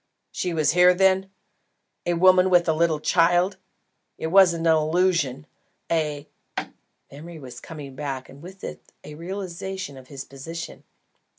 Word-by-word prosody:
"She 180 - -2
was 155 -3 +2
here, 180 +2 +6
then? 190 +1 +3 0.8
a 175 - +2
woman 185 +1 +5
with 175 -1 +4
a 160 - +3
little 160 -1 +1
child? 175 +4 +2 0.6
It 160 - -4
wasn't 175 -4 +5
an 165 - +6
illusion, 155 -3 +1 0.5
a 150 -3 -1 0.4
." - - -34
Memory 165 +4 -10
was 130 -5 -10
coming 145 -4 -9
back 135 -2 -5
and 140 - -14
with 185 +3 -12
it - - -6 0.2
a 150 - -10
realisation 185 -2 -6
of 130 -1 -13
his 135 -1 -8
position. 165 +5 -8
165 Hz, 150 wpm, -24 LUFS, 150-180 Hz, 0.8 s, here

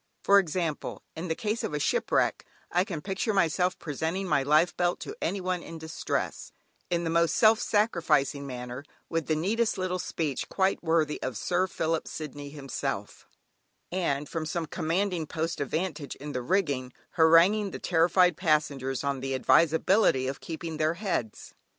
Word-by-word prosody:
For 200 0 +7
example, 170 -4 -3
in 165 +3 -5
the 160 - -1
case 215 +4 -2
of 150 - -2
a - - -1
shipwreck, - - +1 0.3
I 180 - +3
can 180 -7 -5
picture 200 +2 -1
myself 180 0 +2
presenting 165 +5 -3
my 150 -4 +3
life 155 +5 +3
belt 175 0 0
to 420 - -6
any 200 - -1
one 185 -1 -2
in 165 - -8
distress, 160 0 -3 0.4
in 170 0 0
the 165 - -1
most 170 0 +2
self 220 0 +5
sacrificing 160 -9 +1
manner, 125 0 -6 0.3
with 165 -2 -1
the 155 - +2
neatest 215 +9 0
little 185 -1 -1
speech, 155 -6 -3
quite 190 -1 +1
worthy 160 -2 +1
of 130 -4 -3
"Sir 180 - +1
Philip 165 -2 -1
Sidney" 145 -2 -7
himself, 140 -2 -5 0.6
and 150 -6 -1
from 160 -2 -4
some 170 0 -2
commanding 170 +1 -1
post 165 0 -3
of 140 - -2
vantage 155 -4 -3
in 145 +2 -7
the 125 - -3
rigging, 140 -5 0 0.2
haranguing 170 +6 +5
the - - -6
terrified 175 +1 +3
passengers 145 -6 0
on 140 -1 -1
the 135 0 -2
advisability 160 - +3
of 135 +1 -4
keeping 165 -1 -5
their 155 +1 +1
heads. 170 - -3
165 Hz, 165 wpm, -28 LUFS, 150-185 Hz, 0.6 s, For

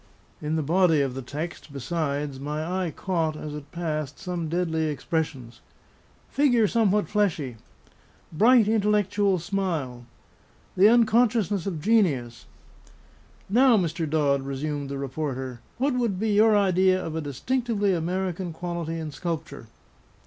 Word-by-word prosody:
In 150 +1 -2
the 160 - 0
body 165 0 +3
of 135 -2 -1
the 135 - -5
text, 150 +4 -6
besides, 140 -1 -3
my 150 +3 -3 0.2
eye - - -2
caught, 165 -2 -2
as 150 -1 -6
it 150 -1 -9
passed, 155 -5 -3
some 180 -4 -4
deadly 165 -2 0
expressions: 150 -5 -3 0.7
"Figure 245 -6 +3
somewhat 210 -2 +2
fleshy," 165 - -1 0.8
"bright, 225 +6 +5
intellectual 205 -2 +2
smile," 160 -10 -3 0.7
"the 190 +3 +6
unconsciousness 220 -4 +3
of 165 -6 -3
genius," 140 - +1 1.0
"'Now, 245 +3 +5
Mr. 165 -3 -1
Dodd,' 145 -3 +2
resumed 140 +1 -4
the 140 - -4
reporter, 130 -2 -4 0.2
'what 275 +2 +1
would 235 -7 -1
be 220 +1 0
your 210 +1 +5
idea 185 -1 +3
of 160 -3 -5
a 160 - -2
distinctively 205 - -1
American 180 +1 -2
quality 170 -1 -4
in 160 -2 -5
sculpture?'" 160 -5 -5
170 Hz, 130 wpm, -25 LUFS, 150-200 Hz, 1.0 s, the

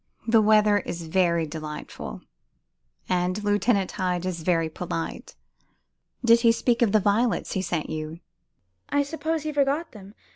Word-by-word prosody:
"The 225 -1 +5
weather 210 -1 +4
is 175 -2 -6
very 170 -1 +2
delightful, 150 0 -7 0.9
and 180 +3 0
Lieutenant 205 -1 +1
Hyde 180 -2 -2
is 180 -3 -3
very 165 -1 +1
polite. 165 0 -5 0.9
Did 230 0 +6
he 230 -1 +6
speak 235 +1 +1
of 230 -4 +4
the 215 - +5
violets 215 +4 +1
he 190 - -1
sent 170 -4 -2
you?" 155 +1 -5 0.7
"I 285 0 +2
suppose 315 +2 -3
he 305 -1 -3
forgot 290 +3 0
them. 200 -1 -13
200 Hz, 145 wpm, -25 LUFS, 170-230 Hz, 0.9 s, Did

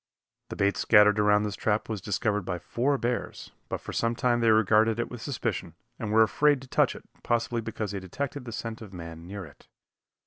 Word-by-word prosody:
The - - -5
bait 100 0 +1
scattered 105 -1 +5
around 105 0 +4
this 105 -1 -3
trap 105 0 0
was 110 -4 -4
discovered 105 +1 0
by 90 -1 -3
four 130 - 0
bears, 120 -1 -3 0.2
but - - -3
for - - -7
some 115 0 0
time 120 0 +1
they 115 -1 +3
regarded 110 +1 +4
it 120 - -2
with 125 -2 -7
suspicion, 115 - -3 0.2
and 110 -4 -3
were 110 +1 +6
afraid 145 +5 +3
to - - -12
touch - - +2
it, - - -11 0.2
possibly 120 0 0
because 110 -2 -4
they 100 - -3
detected 135 +8 -5
the 120 - -6
scent 115 0 -5
of 100 -4 -10
man 85 -1 -9
near 100 0 -6
it. 70 -3 -17
110 Hz, 210 wpm, -27 LUFS, 100-120 Hz, 0.2 s, were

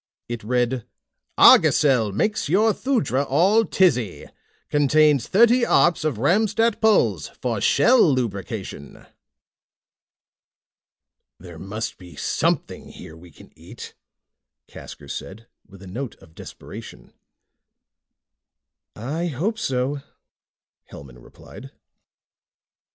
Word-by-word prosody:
It 120 -2 -6
read: 125 +1 -1 0.5
ARGOSEL 125 -8 +5
MAKES 210 - -2
YOUR 215 +6 +3
THUDRA 155 - -1
ALL 195 +11 +2
TIZZY. 125 - 0 0.4
CONTAINS 145 -2 +2
THIRTY 235 +5 +4
ARPS 175 -8 +2
OF 155 -7 -2
RAMSTAT 210 - +1
PULZ, 115 - +2
FOR - - -3
SHELL 240 - +4
LUBRICATION. 100 - -6 2.3
"There 85 -2 -12
must 105 +5 -6
be 90 -2 -14
something - - -2
here 80 - -12
we 85 +2 -15
can 75 - -18
eat," - - -12 0.7
Casker - - -12
said 110 +4 -8 0.2
with 100 -1 -16
a - - -11
note 120 +6 -6
of 80 - -21
desperation. - - -12 1.8
"I 150 +10 -4
hope 180 - -3
so," 135 0 -2 0.9
Hellman 65 -3 -13
replied. - - -14
130 Hz, 95 wpm, -22 LUFS, -, 2.3 s, ARGOSEL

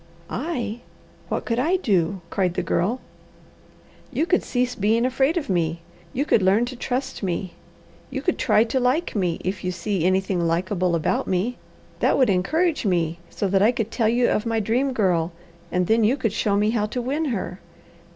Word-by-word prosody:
"I! 240 -6 -3 0.5
What - - -2
could 230 0 0
I 325 +8 +2
do?" 195 - +1
cried 180 -3 0
the - - -1
Girl. 225 +9 0 1.1
"You 280 +5 +1
could 365 +1 +2
cease 250 0 -1
being 220 +3 +2
afraid 265 +6 +2
of 320 - -2
me. 170 -3 0 0.3
You 280 +4 -1
could 230 - +3
learn 195 +5 +3
to 250 +1 -6
trust 255 +2 -3
me. 185 -1 -2 0.6
You - - -4
could - - 0
try 215 - +4
to 235 +3 -1
like 255 +6 +1
me, 180 -5 0
if 185 0 -2
you 180 - -1
see 185 -1 -2
anything 185 0 +1
likeable 180 +1 0
about 165 - 0
me. 195 +7 -1 0.4
That - - +3
would 255 -6 +4
encourage 315 - +1
me 170 -4 0
so 200 - -2
that 195 0 +3
I 215 +4 +5
could 225 -3 -3
tell 225 -3 +2
you 240 +1 +3
of 210 - +1
my 230 -1 0
Dream 240 +6 +1
Girl, 180 -8 +1 0.4
and 180 0 +1
then 225 +4 +3
you 240 +6 +3
could 225 -6 -1
show 205 -2 +1
me 210 +1 +2
how 215 -2 0
to 245 - -4
win 280 +6 -1
her. 200 -8 -3
215 Hz, 190 wpm, -23 LUFS, 185-250 Hz, 1.1 s, I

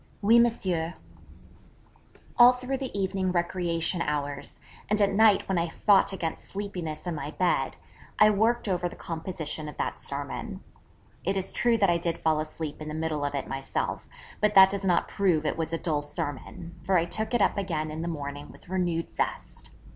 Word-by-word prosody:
'Oui, 230 +4 +6
Monsieur.' 185 -8 +1 1.4
All 245 +1 +8
through 250 +2 -3
the 260 -7 -4
evening 190 -1 0
recreation 175 -1 0
hours, 145 -2 -3 0.3
and 210 0 +3
at 200 -1 +3
night 215 -1 +5
when 190 -3 +1
I 170 0 -1
fought 200 +4 +4
against 170 -4 -4
sleepiness 180 -6 -5
in 175 - -2
my 145 -2 -4
bed, 180 +3 0 0.4
I 215 0 +7
worked 225 +3 +2
over 180 -2 0
the - - -11
composition 160 -2 -5
of - - -11
that - - -2
sermon. 140 0 -5 0.6
It 195 +2 0
is 190 - -3
true 235 +1 +3
that 195 -4 +4
I 170 - +1
did 170 -1 -2
fall 155 -1 +1
asleep 155 -1 -5
in 155 - -6
the 155 - -4
middle 160 -2 -2
of 145 0 -1
it 140 - -3
myself; 135 0 -3 0.3
but 210 0 +2
that 190 0 +9
does 200 0 -3
not 180 -3 +2
prove 175 -6 +1
it - - 0
was 160 0 -3
a 165 - 0
dull 155 -3 -1
sermon, 145 +4 -6
for 190 -1 +2
I 165 - +2
took 220 +7 -2
it - - +3
up 190 - +2
again 165 -6 -2
in 155 +1 -5
the 170 - -3
morning 145 -3 -5
with - - -17
renewed 175 -3 -1
zest. - - -3
175 Hz, 190 wpm, -27 LUFS, 155-195 Hz, 1.4 s, that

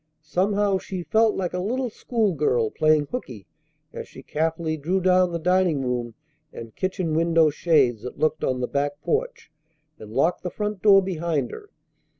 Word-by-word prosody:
Somehow 195 +5 +1
she 185 -1 -6
felt 220 +3 +2
like 180 -2 -3
a 180 - -2
little 245 +6 -2
schoolgirl 150 - 0
playing 155 -1 +3
hookey 125 - -7 0.5
as - - -7
she - - -13
carefully 160 +1 -1
drew 165 +6 -1
down 185 -1 +3
the 170 - -2
dining 180 -4 +1
room 120 -2 -3 0.4
and 115 -1 -10
kitchen 185 -3 -2
window 165 -1 +3
shades 140 -8 +2
that 125 - -8
looked 155 0 0
on 130 -1 0
the 125 - -1
back 145 +1 -2
porch, - - -2 0.5
and 105 -1 -11
locked 140 +9 +1
the 180 - -4
front 210 0 -4
door 195 -2 +6
behind 165 -7 -2
her. 415 - -10
170 Hz, 165 wpm, -24 LUFS, 145-190 Hz, 0.5 s, door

